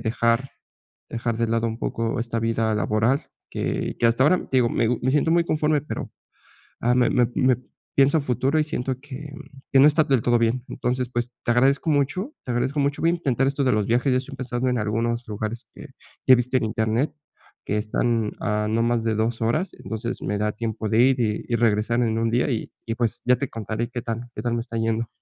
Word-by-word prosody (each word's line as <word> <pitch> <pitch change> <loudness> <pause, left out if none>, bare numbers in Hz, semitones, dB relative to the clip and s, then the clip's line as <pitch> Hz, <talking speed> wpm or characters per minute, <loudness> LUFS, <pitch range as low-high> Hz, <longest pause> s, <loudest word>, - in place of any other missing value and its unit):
dejar 115 +3 +1 0.6
dejar 115 0 -2
de 115 - +1
lado 115 +1 +1
un 115 0 -4
poco 115 +3 -2
esta 115 0 -2
vida 115 -1 0
laboral 110 +5 +2 0.3
que - - -2
que - - +3
hasta 115 +3 +3
ahora, 170 +6 +5
te 130 - +2
digo, 120 -2 +3
me 115 - +1
gu 120 -1 0
me 130 - +2
siento 150 +3 +2
muy 170 0 +4
conforme, 155 -2 +1
pero, 150 - -5 0.7
ah, 120 +1 +3
me 125 -1 +4
me 125 - +3
me 130 -1 +3 0.4
pienso 140 +3 +5
a - - +1
futuro, 135 +2 0
y - - +2
siento 130 -4 -3
que, 145 +1 -8
mm, 140 - -12
que 135 - +6
no 140 - +8
está 150 +1 +3
del 135 -4 +2
todo 120 0 +3
bien. 115 +2 +1
Entonces, 125 0 -2
pues, 120 0 -2
te - - 0
agradezco 135 +6 +3
mucho. 170 - 0
Te 125 - -3
agradezco 130 +5 0
mucho, 140 +1 0
voy 165 - +4
a - - +1
intentar 135 -6 0
esto 140 0 0
de 130 - +3
los 105 -1 +1
viajes, 125 +3 +2
ya 125 - +3
estoy 135 +2 -7
pensando 125 0 -2
en 125 - 0
algunos 115 +3 -1
lugares 110 +2 -4
que - - -10 0.4
que 130 - +8
he - - +4
visto 125 +2 0
en - - -2
internet 110 +5 0 0.5
que 105 - -1
están 110 +1 0
a 105 0 0
no 115 +1 +1
más 115 -1 +1
de 115 -1 +1
2 115 +2 -1
horas. 140 +12 0
Entonces, 110 -1 -4
me 105 - -1
da 105 +1 0
tiempo 110 0 -3
de 110 - +2
ir, 130 0 +3
y 105 -3 0
y 120 - +1
regresar 115 +1 +2
en 110 -1 +1
1 115 0 +1
día 125 +4 +1
y 115 - -2 0.2
y, 115 - -2
pues, 115 -2 -1
ya 125 0 +4
te 140 - -3
contaré 115 -1 -4
qué 120 -1 -4
tal, 115 +1 -4
qué 105 - -5
tal 120 0 -1
me 120 - -1
está 115 0 -6
yendo. 115 0 0
120 Hz, 235 wpm, -24 LUFS, 115-135 Hz, 0.7 s, no